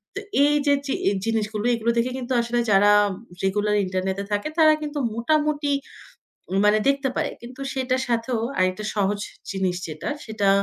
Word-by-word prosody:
তো - - -2 0.2
এই 295 +1 +4
যে 285 - +4
জি 275 - -1 0.3
জিনিসগুলো 215 -1 -1
এগুলো 230 0 +1
দেখে 240 +2 +1
কিন্তু 260 0 -3
আসলে 235 +1 -1
যারা 205 +1 +6 0.5
রেগুলার 205 +2 +1
ইন্টারনেটে 190 +1 -2
থাকে, 205 +4 0
তারা 310 -1 +7
কিন্তু 295 -1 -3 0.2
মোটামুটি 295 +4 +1 0.9
মানে 210 +1 +5
দেখতে 275 -1 +2
পায়। - - -1
কিন্তু 250 +3 -10
সেটার 260 -1 0
সাথেও 235 0 0 0.2
আরেকটা 185 +2 +1
সহজ 205 0 +1 0.3
জিনিস 190 -2 -1
যেটা, 155 - -5 0.2
সেটা 215 -3 0
230 Hz, 150 wpm, -24 LUFS, 205-265 Hz, 0.9 s, তারা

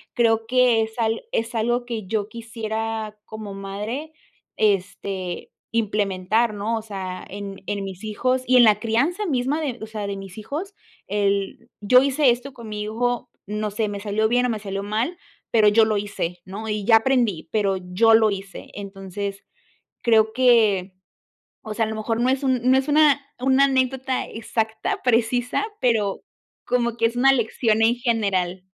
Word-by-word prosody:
creo 225 -2 +2
que 250 -2 +4
es 220 +1 -4
al 225 -1 0
es 230 +2 -1
algo 240 +2 0
que 230 -4 -5
yo 210 0 -1
quisiera 225 -2 -4
como 215 -2 -8
madre, 210 +10 -5 0.4
este, 195 -3 -1 0.2
implementar, 210 0 0
¿no?, 210 +3 -1
o - - -4
sea, 190 -4 -6
en 200 0 -7
en 205 -1 -2
mis 190 0 -8
hijos 255 +4 0
y 255 - +5
en 245 - +8
la 210 -2 +5
crianza 280 - 0
misma 275 +1 0
de, 270 -6 -3
o - - -6
sea, 215 -2 -5
de 200 -1 -4
mis 195 +1 -9
hijos. 315 - -5 0.3
El: 200 -1 -1
“Yo 250 +5 +6
hice 275 -1 +3
esto 250 +4 -4
con 235 -3 -10
mi 210 0 -4
hijo, 245 +3 -2 0.2
no 210 +1 -3
sé, 210 +1 -2
me 200 -1 -5
salió 210 +1 0
bien 245 +2 +2
o - - -2
me 225 - -1
salió 195 -1 -4
mal, 225 - -2 0.3
pero 220 -2 +5
yo 220 +2 +5
lo 215 -1 0
hice, 180 -4 -4
¿no?, 205 +4 -7
y 210 -1 -2
ya 225 0 +7
aprendí, 225 -8 +1
pero 200 -3 +1
yo 185 +5 +3
lo 220 -2 +4
hice". 195 0 -7
Entonces 200 0 -6 0.6
creo 220 -2 +4
que, 220 -7 +3 0.7
o 215 - -6
sea, 225 +1 +1
a - - -4
lo 220 - -4
mejor 225 +2 -2
no 250 - +2
es 265 +1 +1
un 260 -2 +1
no 260 - +6
es 265 +2 0
una 295 -1 +5 0.2
una 265 +2 +4
anécdota 260 -1 0
exacta, 220 0 -2
precisa, 245 - +1 0.2
pero 220 -5 +1 0.4
como 235 -2 0
que 230 -1 +3
es 230 +1 -3
una 270 +2 +5
lección 225 -2 +1
en 225 +2 +5
general. 195 -7 0
220 Hz, 175 wpm, -23 LUFS, 205-245 Hz, 0.7 s, en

